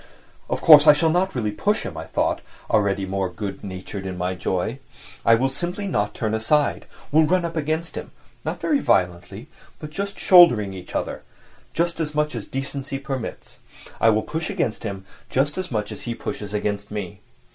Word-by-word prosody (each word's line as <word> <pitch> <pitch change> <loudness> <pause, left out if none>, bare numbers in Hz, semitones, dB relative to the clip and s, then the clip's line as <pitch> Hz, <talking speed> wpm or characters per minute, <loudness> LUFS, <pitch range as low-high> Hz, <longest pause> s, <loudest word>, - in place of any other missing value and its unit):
"Of - - -2
course 150 -1 +9
I 150 - +11
shall 160 +2 +2
not 185 +1 +1
really 110 -4 -1
push 205 - 0
him," 85 - -6
I 80 0 -6
thought, - - 0 0.3
already 100 -2 +2
more 95 0 -1
good 95 +2 -6
natured 95 0 -6
in 95 -1 -5
my 90 +1 -1
joy. 95 +7 -2 0.4
"I 115 - +6
will 135 +3 +1
simply 175 +8 -3
not 105 - -1
turn 110 -2 -1
aside, 125 +7 +1 0.2
will 155 +1 +5
run 180 +1 +2
up 170 0 -4
against 160 +2 -2
him, - - -6 0.3
not - - -3
very 295 -3 +2
violently, 95 - 0 0.3
but 150 -1 -8
just 200 +4 -4
shouldering 120 - +6
each 90 -1 -9
other—just 170 0 -4
as 150 -2 -2
much 150 0 +1
as - - -5
decency 135 +1 -4
permits. 135 -3 -6 0.4
I 115 - +5
will 110 0 +2
push 160 0 -3
against 110 - -1
him 100 -3 -5 0.2
just 145 +3 +1
as 185 0 -4
much 105 -3 -2
as - - -8
he 120 -1 -4
pushes 105 -3 -5
against 105 -1 -2
me." 100 -2 -5
120 Hz, 185 wpm, -23 LUFS, 100-155 Hz, 0.4 s, I